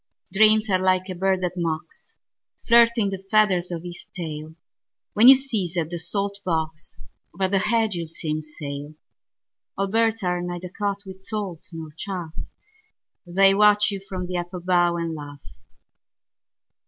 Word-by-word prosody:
Dreams 215 +1 +5
are 185 -2 +2
like 185 0 +1
a - - -3
bird 190 +1 0
that 180 -1 -1
mocks, 170 - -5 0.5
Flirting 235 -3 +5
the 190 -1 -5
feathers 195 -5 +3
of 170 -2 -5
his 175 0 -10
tail. 160 -3 -6 0.6
When 220 +4 +6
you 265 - +12
seize 215 -10 -1
at 165 -1 -1
the 175 - -4
salt 200 +4 -2
box, 160 -2 -3 0.4
Over 190 +1 0
the 195 0 +2
hedge 220 +1 +2
you'll 170 -2 -4
see 160 -1 -4
him 155 0 -2
sail. 145 -1 -7 0.8
Old 195 0 -1
birds 225 -1 +1
are 180 -1 0
neither 175 0 -5
caught 200 +1 -3
with 190 0 -11
salt 195 -5 -4
nor 160 -2 -8
chaff:They 195 - -2
watch 210 +1 +5
you 200 - -4
from 185 -2 -6
the 180 0 -3
apple 175 +1 -5
bough 175 -1 +2
and 165 -1 -3
laugh. 145 -2 -9
185 Hz, 155 wpm, -23 LUFS, 170-205 Hz, 0.8 s, you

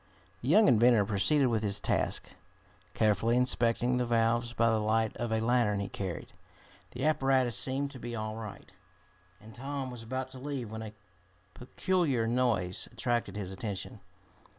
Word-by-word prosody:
The 120 - -6
young 210 +9 +6
inventor 120 -3 +5
proceeded 110 +8 +2
with 115 -2 0
his 105 -1 +2
task, - - -1 0.7
carefully 110 +3 +2
inspecting 125 0 +2
the 125 - 0
valves 120 +1 +1
by 115 -1 +2
the 110 - +1
light 110 +1 0
of 120 -1 -3
a 110 - +1
lantern 115 -3 +2
he 100 - -3
carried. 95 -4 -5 0.6
The 130 +4 -3
apparatus 135 -5 +2
seemed 140 +1 0
to 130 - -10
be 120 0 -5
all 110 -1 -4
right, 110 -3 -9 0.7
and 110 +1 -14
Tom 135 +1 -5
was 120 -2 -8
about 130 +3 -4
to 130 - -9
leave 130 -5 -5
when 110 0 -6
a 110 -1 -7 0.6
peculiar 140 -2 0
noise 115 -7 0
attracted 120 -5 -2
his 100 -3 -5
attention. 100 0 -6
120 Hz, 160 wpm, -30 LUFS, 110-130 Hz, 0.7 s, young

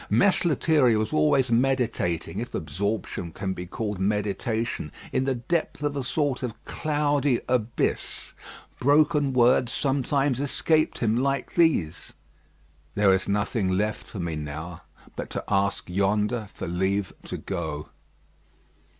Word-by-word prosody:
Mess 200 -1 +4
Lethierry 145 -6 +3
was 110 -1 -1
always 120 - +3
meditating, 115 -8 0
if 120 - -5
absorption 90 +2 -3
can 95 +3 -3
be 90 -1 -7
called 105 0 -4
meditation, 105 -2 -1 0.2
in 130 - +1
the 135 -1 +1
depth 150 +4 -2
of 145 -1 0
a 140 - -2
sort 140 0 0
of 125 -4 -6
cloudy 145 -4 +1
abyss. 120 -2 -1 0.5
Broken 145 +1 +3
words 125 -1 +4
sometimes 135 0 +1
escaped 155 +3 +1
him 110 -2 +1
like 135 +3 0
these, 125 - +1 0.8
"There 100 -1 +5
is 95 - 0
nothing 105 0 0
left 105 +3 -1
for - - -9
me 85 -2 -2
now, 75 +3 -6 0.3
but - - -5
to - - -4
ask 100 0 0
yonder 105 +4 0
for - - -6
leave 95 +2 0
to - - -4
go." 80 -6 -4
115 Hz, 135 wpm, -26 LUFS, 95-135 Hz, 0.8 s, There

